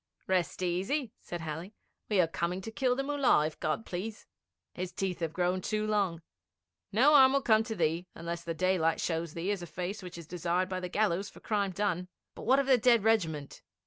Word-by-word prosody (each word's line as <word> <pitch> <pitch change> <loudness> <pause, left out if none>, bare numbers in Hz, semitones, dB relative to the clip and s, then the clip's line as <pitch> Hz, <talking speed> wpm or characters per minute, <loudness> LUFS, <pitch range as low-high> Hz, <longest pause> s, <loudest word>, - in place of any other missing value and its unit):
'Rest 185 -1 0
easy,' 195 - -1
said 175 -1 -6
Halley; 165 +6 -6 0.3
'we 205 -3 +2
are 170 - +2
coming 170 +2 -2
to 225 - -7
kill 250 +2 +1
the 275 - -1
Mullah, 280 - +3
if 155 - -5
God 155 +8 -1
please. 205 +5 -5 0.5
His 180 0 -4
teeth 185 -3 -3
have 165 -2 -2
grown 180 +2 0
too 215 +3 -1
long. 195 -6 0 0.7
No 260 +9 +5
harm 265 -2 +8
will 275 - +3
come 220 -2 +5
to 225 -2 -4
thee 165 0 0
unless 170 0 -5
the 165 -1 -4
daylight 175 -2 +2
shows 165 -1 -2
thee 175 +4 -1
as 200 -3 -2
a 175 - -6
face 185 +5 -4
which 180 -2 -8
is 170 - -8
desired 180 +2 -1
by 185 -1 -2
the 180 -1 -5
gallows 200 -1 0
for - - -15
crime 205 -2 0
done. 180 -2 -1 0.3
But - - -9
what 260 +2 +6
of 275 - +2
the 260 -2 +5
dead 235 -2 +4
regiment?' 165 -10 0
185 Hz, 210 wpm, -31 LUFS, 170-215 Hz, 0.7 s, harm